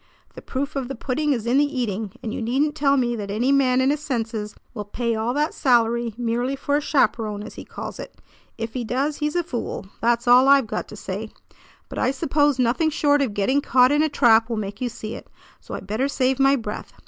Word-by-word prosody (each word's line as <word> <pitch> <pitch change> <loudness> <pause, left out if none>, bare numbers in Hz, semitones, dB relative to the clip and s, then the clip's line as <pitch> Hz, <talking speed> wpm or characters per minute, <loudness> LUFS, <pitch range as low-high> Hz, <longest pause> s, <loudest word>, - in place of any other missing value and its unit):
The - - -10
proof 280 +3 -4
of 270 -3 -2
the 270 - -5
pudding 285 +5 -1
is 235 -5 -1
in 245 +4 +3
the - - +5 0.2
eating, 210 -3 -3
and 220 - -4
you - - -4
needn't 270 +6 +1
tell 280 -2 +2
me 240 -2 +1
that 205 -2 -5
any 230 +7 +1
man 260 -2 +3
in 260 +1 +3
his 295 - -1
senses 225 -7 -3 0.2
will 210 -4 -5
pay 230 +3 -2
all 225 +2 -1
that 300 +2 0
salary 235 -3 +2
merely 245 +2 -1
for 285 +1 -1
a 295 - +2
'chaperon,' 220 -7 0
as 215 - -9
he - - -9
calls - - -8
it. - - -8 0.4
If 225 -1 -5
he 250 - -3
does, 270 +6 -1
he's 300 +1 -2
a 350 - +1
fool; 245 - -5 0.2
that's 235 +1 +1
all 250 +2 +7
I've 275 -2 +6
got 220 - -4
to - - -10
say. - - -5 0.6
But - - -6
I - - +2
suppose 290 0 +1
nothing 255 +6 +2
short 290 -1 +2
of 235 -7 -1
getting 260 +8 +2
caught 255 -1 +4
in 295 +1 +3
a 310 - +2
trap 230 -5 +4
will 230 - -2
make 205 0 -5
you 250 - 0
see 220 -1 -7
it; - - -9 0.3
so - - -8
I - - -6
better 215 +7 -1
save 265 -1 0
my 275 +1 +5
breath. 215 -5 -6
250 Hz, 235 wpm, -23 LUFS, 225-280 Hz, 0.6 s, all